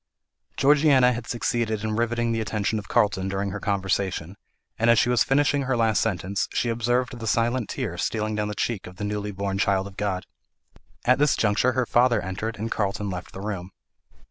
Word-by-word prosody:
Georgiana 140 -3 +5
had 115 -1 -6
succeeded 115 -3 -1
in 110 -1 -1
riveting 120 +1 0
the 115 -1 0
attention 105 0 -1
of 100 - -10
Carlton 100 -5 +1
during 100 0 -2
her 105 - -4
conversation, 95 -3 -1 0.4
and 115 +1 +3
as 115 - +6
she 120 - +3
was 125 -1 +4
finishing 145 +1 +2
her 130 -2 0
last 110 -2 +2
sentence, 95 +2 -1
she 120 - 0
observed 120 +2 0
the 115 - -5
silent 115 +1 +1
tear 105 - -4
stealing 110 +1 -1
down 105 0 -1
the 105 - -4
cheek 110 -4 -2
of 90 - -11
the 105 - -6
newly 105 0 -2
born 100 -1 -3
child 95 -1 +2
of 100 -1 -11
God. 100 -3 -2 0.8
At 125 +2 +4
this 145 -1 +4
juncture 110 +4 +2
her 130 0 +1
father 120 +1 +3
entered, 105 +4 -4
and 110 +2 -4
Carlton 100 -1 -1
left 90 0 -6
the 95 - -8
room. 95 -3 -4
110 Hz, 195 wpm, -25 LUFS, 100-120 Hz, 0.8 s, as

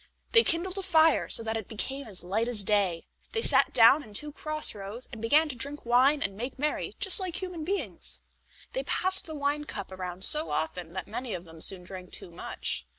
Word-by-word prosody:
They 460 -1 +6
kindled 365 +3 +1
a - - -3
fire, 325 -4 +3
so 230 - +3
that 220 0 -3
it 220 - -7
became 265 +4 -3
as 195 -5 -7
light 210 +6 -1
as 225 -4 +2
day. 195 -5 0 0.3
They 450 -1 -1
sat - - +3
down 240 +5 +6
in 215 -7 -14
two 295 +7 -3
cross 305 +1 -1
rows, 205 +5 -6
and 225 - -8
began 295 +8 +3
to 265 - -4
drink 280 +4 -2
wine 260 +5 +3
and 195 -1 -3
make 245 +6 -6
merry 300 +2 -2
just 390 -1 +5
like 370 -3 -4
human 365 -4 -5
beings. 390 +5 -2 0.5
They - - -1
passed 375 -6 +3
the 315 - -7
wine 290 +1 -2
cup 200 -8 -7
around 185 0 -1
so 305 +1 +6
often 165 +1 -4
that 185 - -5
many 235 +1 -5
of 175 - -7
them 165 -1 -14
soon 185 0 0
drank 185 0 -10
too 175 - -9
much. - - -5
245 Hz, 215 wpm, -28 LUFS, 195-310 Hz, 0.5 s, They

